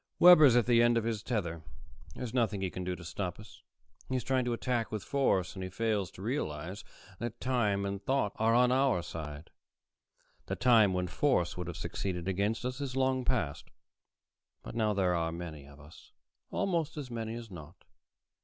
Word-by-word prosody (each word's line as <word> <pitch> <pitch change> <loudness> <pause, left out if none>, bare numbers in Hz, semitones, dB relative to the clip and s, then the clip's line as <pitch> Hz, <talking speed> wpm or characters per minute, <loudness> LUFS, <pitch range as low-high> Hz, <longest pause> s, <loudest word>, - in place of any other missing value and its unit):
Webber's 155 -8 +8
at 120 -3 +4
the 120 -1 +5
end 120 0 +4
of 115 - +1
his 115 -2 -2
tether. 85 -9 -2 0.5
There's 125 -2 -5
nothing 110 -6 +1
he 95 -2 -2
can 90 - -5
do 90 0 -2
to 85 - -11
stop 90 +4 -4
us. 105 +1 -14 0.5
He's 130 -2 -1
trying 130 -1 +1
to 120 - 0
attack 120 -1 -1
with 110 -2 -3
force, 115 -10 +1
and 95 - -6
he 95 - -4
fails 105 -1 -1
to 95 - -10
realize 95 - -3 0.4
that 120 -1 -5
time 105 -6 +1
and 100 0 -4
thought 130 -6 +1
are 115 +1 +3
on 125 0 +5
our 130 -8 +2
side. 75 -2 -7 1.0
The - - -2
time 115 -6 +5
when 90 0 0
force 90 - +1
would 90 -2 -5
have 85 -1 -5
succeeded 90 0 -4
against 100 +5 -1
us 125 +2 -3
is 135 -2 -4
long 130 -1 +1
past. 105 - -1 0.9
But - - -8
now 110 -2 +1
there 95 -2 +2
are 80 -1 0
many 80 -4 -7
of 70 0 -15
us, 75 +2 -16 0.4
almost 165 -4 -1
as 135 -4 -6
many 115 -1 -4
as 115 -3 -8
not." 85 0 -12
110 Hz, 190 wpm, -31 LUFS, 90-125 Hz, 1.0 s, Webber's